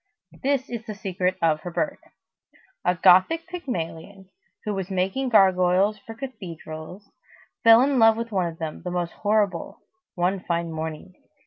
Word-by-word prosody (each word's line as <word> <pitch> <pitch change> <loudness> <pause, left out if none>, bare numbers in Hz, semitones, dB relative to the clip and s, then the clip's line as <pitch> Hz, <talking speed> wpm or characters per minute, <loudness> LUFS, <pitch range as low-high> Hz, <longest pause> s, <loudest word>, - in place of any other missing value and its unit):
This 270 -1 0
is 235 -2 -6
the 215 - -5
secret 185 -2 -2
of 155 -2 +3
her 175 - -7
birth: 285 - -2 0.8
a 180 - +2
Gothic 185 - +5
Pygmalion, 190 - -6 0.3
who 210 - -1
was 190 -1 -4
making 195 +8 -1
gargoyles 190 0 +4
for 225 +3 -10
cathedrals, 180 - -9 0.5
fell 230 +2 +8
in 275 -1 +2
love 225 -1 +6
with 230 0 -4
one 185 -4 +1
of 165 -1 -7
them, 160 -2 -5
the 180 - -5
most 175 -1 -2
horrible, 205 -4 -1 0.3
one 185 +2 0
fine 170 -2 -2
morning. 160 +3 -6
190 Hz, 150 wpm, -24 LUFS, 175-225 Hz, 0.8 s, fell